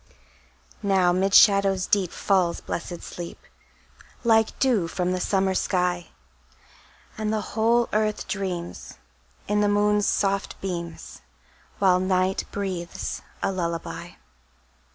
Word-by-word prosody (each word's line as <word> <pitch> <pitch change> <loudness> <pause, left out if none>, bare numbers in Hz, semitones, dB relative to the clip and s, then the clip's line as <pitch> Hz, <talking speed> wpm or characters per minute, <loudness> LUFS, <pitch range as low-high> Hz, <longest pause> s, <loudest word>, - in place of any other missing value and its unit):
Now 190 -3 +3
'mid 190 +2 +2
shadows 195 -2 +5
deep 195 -4 +1
Falls 185 -4 +1
blessed 175 0 -5
sleep, 170 -1 -7 0.9
Like 225 -2 +3
dew 235 -10 +2
from 180 +1 -1
the 185 - -1
summer 190 0 +1
sky; 180 -2 0 1.1
And 215 -1 -1
the 215 -3 -3
whole 230 +2 +3
earth 215 0 0
dreams, 185 -4 -4 0.5
In 210 0 +1
the 205 - +3
moon's 205 0 +2
soft 195 0 0
beams, 170 -3 -6 0.6
While 185 -2 +4
night 185 0 +1
breathes 185 -3 -4 0.2
a 195 - +1
lullaby. 170 -3 -4
190 Hz, 110 wpm, -25 LUFS, 180-205 Hz, 1.1 s, shadows